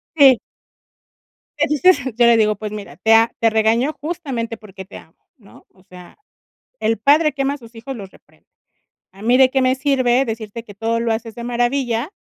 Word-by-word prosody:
Eh. 270 -5 +7 1.2
Le - - +3
dices 320 +4 +4 0.2
yo 240 0 +4
le 235 -1 +5
digo: 215 -1 +2
"Pues 210 +1 -7
mira, 205 -9 -9
te 220 +5 +2
a 225 +1 +5
te 225 - +3
regañó 225 +6 +1
justamente 275 -9 -5
porque 195 -3 -12
te 200 - -12
amo, 160 - -17 0.2
¿no? 205 -5 -19
O 185 - -25
sea, 180 -2 -15 0.6
el 225 0 0
padre 300 +6 +3
que 275 0 -3
ama 275 +1 -1
a - - -9
sus 235 -2 -16
hijos 255 +4 -8
los 195 -4 -9
reprende, - - -25 0.7
a 195 - -15
mí 240 +3 +3
de 260 -1 +5
qué 265 0 +1
me 255 0 +2
sirve 260 -2 +1
decirte 225 -1 -6
que 205 -3 -13
todo 225 +2 -2
lo 230 -1 0
haces 225 0 -5
de 235 - -7
maravilla, 245 +3 -1
230 Hz, 200 wpm, -19 LUFS, 220-265 Hz, 1.2 s, Eh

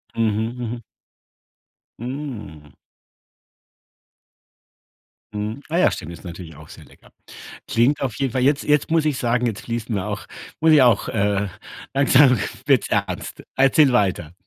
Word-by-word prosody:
Mhm, 110 +1 -1
mhm. 120 -1 -5 1.2
Mm. 115 - -7 2.6
Mhm, 105 +5 -4
ah 165 - 0
ja, - - +5
stimmt, 85 -1 -6
ist 85 - -12
natürlich 85 -2 -9
auch 80 +1 -14
sehr - - -13
lecker. - - -21 0.6
Klingt 130 +6 +2
auf 130 -5 -2
jeden 135 -3 -1
Fall 130 -1 0
jetzt 145 +1 +2
jetzt 150 +1 +1
muss 165 -1 +3
ich 150 -4 0
sagen, 120 0 0
jetzt 110 -3 -4
fließen 115 -1 -4
mir 95 -2 -2
auch - - -5 0.3
muss 160 0 +4
ich 150 -3 +7
auch, 120 -5 +3
äh 100 -1 0 0.5
langsam 135 -2 +5 0.3
wird's - - +3
ernst. - - -3
Erzähl 135 +1 +4
weiter. 95 -8 0
120 Hz, 140 wpm, -21 LUFS, 105-135 Hz, 2.6 s, ich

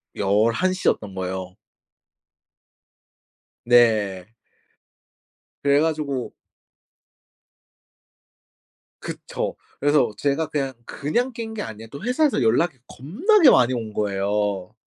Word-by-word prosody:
11시였던 110 - +1
거예요. 95 0 -5 2.1
네. 110 -6 +3 1.4
그래 140 0 +4
가지고 150 -5 -2 2.7
그쵸. - - -5 0.2
그래서 145 -5 +3
제가 145 +3 0
그냥 135 -3 -2
그냥 240 - -2
깬 225 -2 -6
게 210 - -4
아니라 110 +1 -9
또 140 - -9
회사에서 250 - +1
연락이 130 +6 +2
겁나게 300 - +3
많이 125 0 +4
온 115 -3 -4
거예요. 100 -1 -1
130 Hz, 180 characters per minute, -23 LUFS, 105-160 Hz, 2.7 s, 그래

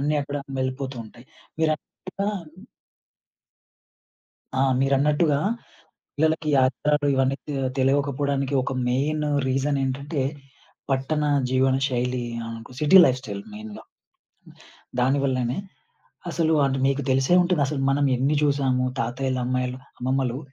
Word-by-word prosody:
అన్నీ, 150 +2 +1
అక్కడ 145 +1 -5 0.2
వెళ్ళిపోతూ 130 0 -3
ఉంటాయి. 120 +3 -15 0.4
మీరన్నట్టుగా 175 +5 -2 2.3
ఆ! - - +4 0.2
మీరన్నట్టుగా 145 +2 +2 0.8
పిల్లలకి 160 +1 +1
ఆచారాలు 145 +3 +1
ఇవన్నీ, 135 +1 +1
తె 145 - -3 0.2
తెలివకపోవడానికి 140 0 +1
ఒక 135 - -3 0.2
మెయిన్ 150 +5 0 0.2
రీజనేంటంటే. 135 +1 -1 0.7
పట్టణ 150 +3 0 0.3
జీవన 130 0 +3
శైలి. 125 -1 -1 0.2
అనుక 115 +2 -9
సిటీ 150 +5 +5
లైఫ్‌స్టైల్ 130 +9 -2
మెయిన్‌గా. 215 0 -9 1.2
దానివల్లనే, 130 -1 +1 0.7
అసలు 160 -1 +1
అంటె 135 -1 0
మీకు 140 +1 +1
తెలిసే 135 +6 +3
ఉంటదసలు. 150 -5 0
మనం 140 +1 +2
ఎన్ని 135 +4 +1
జూసాము. 135 -3 +2 0.2
తాతయ్యలు, 130 +3 -1
అమ్మాయిలు 125 0 -1 0.2
అమ్మమ్మలు, 130 0 -1
135 Hz, 100 wpm, -24 LUFS, 130-150 Hz, 2.3 s, సిటీ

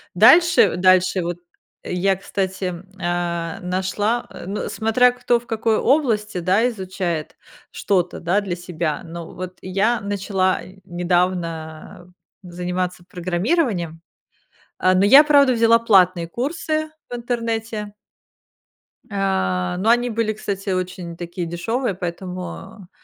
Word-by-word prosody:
Дальше 330 - +6
дальше 185 0 +3
вот, 170 0 -3 0.5
я, 190 +2 0
кстати, 190 -1 -3 0.3
а, 170 -1 -2
нашла, 190 +6 -1 0.2
ну, 200 +3 -3
смотря 230 +3 +3
кто 245 -1 +1
в 240 - -20
какой 225 -1 0
области, 225 -9 +1
да, 190 +6 +2
изучает 185 -6 -4 0.4
что-то, 180 -3 -1
да, 180 +4 +1
для 195 -4 -3
себя, 170 -3 -3
но 170 0 -8
вот 185 0 -7
я 200 +6 0
начала 195 -2 0 0.2
недавно 175 -2 -2 0.3
заниматься 180 0 -4
программированием. 180 - -1 0.8
А, 185 0 +3
но 185 +1 +3
я, 275 +9 +8
правда, 285 -3 +5
взяла 230 -1 +5
платные 185 -6 +3
курсы 310 - -2 0.2
в - - -5
интернете. 225 -3 -3 1.2
А, 140 - 0
но 210 +5 +2
они 240 +1 +3
были, 225 -1 0
кстати, 200 -2 -4
очень 180 -2 -3
такие 175 +1 -5
дешевые, 205 +7 -2
поэтому, 180 +1 -7
190 Hz, 115 wpm, -21 LUFS, 175-225 Hz, 1.2 s, я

